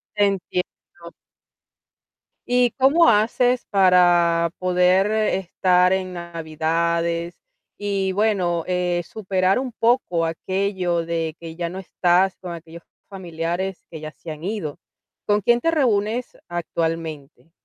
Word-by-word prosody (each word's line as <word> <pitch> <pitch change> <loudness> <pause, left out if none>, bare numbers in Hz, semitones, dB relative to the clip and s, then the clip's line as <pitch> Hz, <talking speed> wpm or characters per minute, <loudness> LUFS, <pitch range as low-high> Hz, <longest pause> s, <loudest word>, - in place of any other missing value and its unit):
Te 205 - +3
entiendo. 180 -3 -5 1.4
¿Y 245 0 +4
cómo 295 +6 +5
haces 240 +3 +2
para 175 -3 +4
poder 185 +2 +3
estar 185 -3 +2
en 185 -1 -2
navidades 170 0 -2 0.4
y, 195 -2 -1
bueno, 185 -5 +1
eh, 180 -1 0
superar 190 -2 0
un 260 0 -3
poco 230 -8 +1
aquello 180 +1 -1
de 165 -1 -3
que 165 -1 -9
ya 170 0 -2
no 180 +3 -7
estás 185 0 +1
con 180 -2 -6
aquellos 170 0 -11 0.3
familiares 175 0 -4
que 160 - -8
ya 155 0 -7
se 165 - -10
han 155 +1 -8
ido? 185 -7 -4 0.5
¿Con 205 0 +2
quién 240 +4 +3
te 330 - +2
reúnes 235 -5 0
actualmente? 165 -3 -4
180 Hz, 120 wpm, -22 LUFS, 170-200 Hz, 1.4 s, cómo